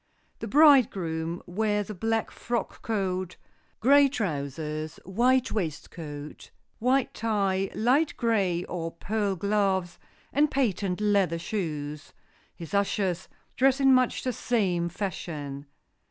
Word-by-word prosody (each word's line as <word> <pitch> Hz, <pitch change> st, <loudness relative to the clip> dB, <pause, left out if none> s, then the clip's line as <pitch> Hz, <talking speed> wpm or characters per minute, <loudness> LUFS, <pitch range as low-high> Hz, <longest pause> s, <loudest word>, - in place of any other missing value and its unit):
The -, -, -5 dB
bridegroom 190 Hz, -, +4 dB
wears 210 Hz, +2 st, -1 dB
a -, -, -4 dB
black 225 Hz, +3 st, -1 dB
frock 235 Hz, -1 st, -4 dB
coat, 185 Hz, -4 st, -2 dB, 0.5 s
gray 280 Hz, +3 st, +6 dB
trousers, 155 Hz, -, -3 dB
white 250 Hz, +7 st, +2 dB
waistcoat, 155 Hz, -5 st, -5 dB, 0.3 s
white 255 Hz, +3 st, +2 dB
tie, 195 Hz, -4 st, 0 dB
light 265 Hz, +8 st, +2 dB
gray 195 Hz, -7 st, +1 dB
or 165 Hz, -2 st, -4 dB
pearl 205 Hz, +2 st, -1 dB
gloves 190 Hz, -2 st, 0 dB, 0.3 s
and 295 Hz, +2 st, +3 dB
patent 205 Hz, -8 st, 0 dB
leather 200 Hz, -5 st, +2 dB
shoes. 150 Hz, -6 st, -4 dB, 0.4 s
His 165 Hz, +1 st, -9 dB
ushers 195 Hz, -2 st, 0 dB, 0.3 s
dress 270 Hz, +1 st, +3 dB
in 270 Hz, -1 st, +6 dB
much 255 Hz, -1 st, +2 dB
the 255 Hz, -, -1 dB
same 185 Hz, -8 st, 0 dB
fashion. 150 Hz, -7 st, -5 dB
195 Hz, 110 wpm, -27 LUFS, 170-230 Hz, 0.5 s, gray